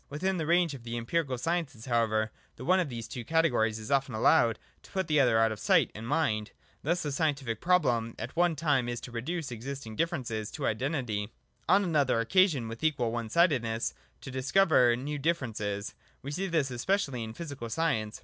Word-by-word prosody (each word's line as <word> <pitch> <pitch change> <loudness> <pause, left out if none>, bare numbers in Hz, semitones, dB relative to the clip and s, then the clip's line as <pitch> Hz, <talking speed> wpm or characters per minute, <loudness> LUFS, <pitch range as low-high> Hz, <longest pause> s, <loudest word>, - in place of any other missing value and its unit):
Within 185 +6 -1
the 160 -3 -2
range 170 -2 +3
of 135 - -8
the 115 0 -5
empirical 130 +3 -1
sciences 145 -4 -2
however, 110 -3 +1 0.2
the 130 - -9
one 185 +2 +4
of 175 -5 0
these 115 -2 -6
two 120 0 -6
categories 120 -8 +2
is 110 +2 -7
often 135 -3 +1
allowed 115 +1 +4 0.2
to - - -17
put 190 -1 -1
the 150 -2 +2
other 120 -5 +4
out 115 0 +4
of 110 - -5
sight 165 - +3
and 110 +2 -7
mind. 110 -7 0 0.3
Thus 170 +4 0
the 150 - -2
scientific 135 -6 -1
problem 125 -11 +2
at 115 +3 -6
one 175 -1 +3
time 140 -5 +1
is 120 -1 -3
to 125 - -9
reduce 140 +5 -4
existing 120 -1 -6
differences 115 -8 -2
to - - -3
identity; 115 -4 -1 0.4
on 195 +3 +5
another 145 -9 +2
occasion, 145 - +3
with 115 +4 -8
equal 135 -7 +1
one 115 -1 -3
sidedness, 120 -8 +2 0.3
to 135 - -8
discover 130 -2 +4
new 145 +4 -4
differ 165 -1 0
ences. 100 -3 -4 0.3
We 140 - -5
see 190 +6 -2
this 155 -7 0
especially 135 - -1
in 110 0 -7
physical 140 -7 -6
science. 110 -8 -1
130 Hz, 195 wpm, -29 LUFS, 115-160 Hz, 0.4 s, on